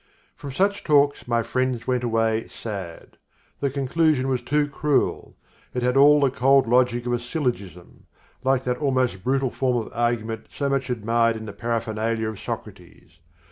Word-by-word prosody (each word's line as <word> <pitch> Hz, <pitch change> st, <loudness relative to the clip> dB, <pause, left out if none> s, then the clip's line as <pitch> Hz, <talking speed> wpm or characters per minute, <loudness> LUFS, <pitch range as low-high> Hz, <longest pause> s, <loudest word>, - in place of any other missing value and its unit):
From 145 Hz, -2 st, -8 dB
such 200 Hz, +7 st, 0 dB
talks 145 Hz, -3 st, +2 dB
my 115 Hz, -1 st, +1 dB
friends 125 Hz, 0 st, -1 dB
went 125 Hz, -1 st, 0 dB
away 115 Hz, -1 st, 0 dB
sad. 95 Hz, -7 st, -8 dB, 0.4 s
The 140 Hz, -, 0 dB
conclusion 140 Hz, 0 st, +1 dB
was 130 Hz, -2 st, 0 dB
too 145 Hz, +4 st, +1 dB
cruel. 145 Hz, 0 st, -1 dB, 0.4 s
It 125 Hz, -, -1 dB
had 125 Hz, +1 st, +1 dB
all 145 Hz, +2 st, +7 dB
the 140 Hz, -2 st, +2 dB
cold 135 Hz, 0 st, +3 dB
logic 120 Hz, 0 st, +2 dB
of 120 Hz, -, -1 dB
a 120 Hz, -, 0 dB
syllogism 120 Hz, -, -5 dB, 0.4 s
(like 130 Hz, -1 st, +2 dB
that 125 Hz, -1 st, -1 dB
almost 130 Hz, -9 st, 0 dB
brutal 135 Hz, 0 st, 0 dB
form 125 Hz, -2 st, 0 dB
of -, -, -13 dB
argument 115 Hz, -2 st, -2 dB
so 140 Hz, -1 st, -2 dB
much 135 Hz, -1 st, -1 dB
admired 115 Hz, 0 st, +1 dB
in 110 Hz, -, -8 dB
the 100 Hz, -, -7 dB
Paraphernalia 115 Hz, -1 st, -2 dB
of 110 Hz, -, -8 dB
Socrates). 85 Hz, -, -9 dB
125 Hz, 165 wpm, -24 LUFS, 115-135 Hz, 0.4 s, all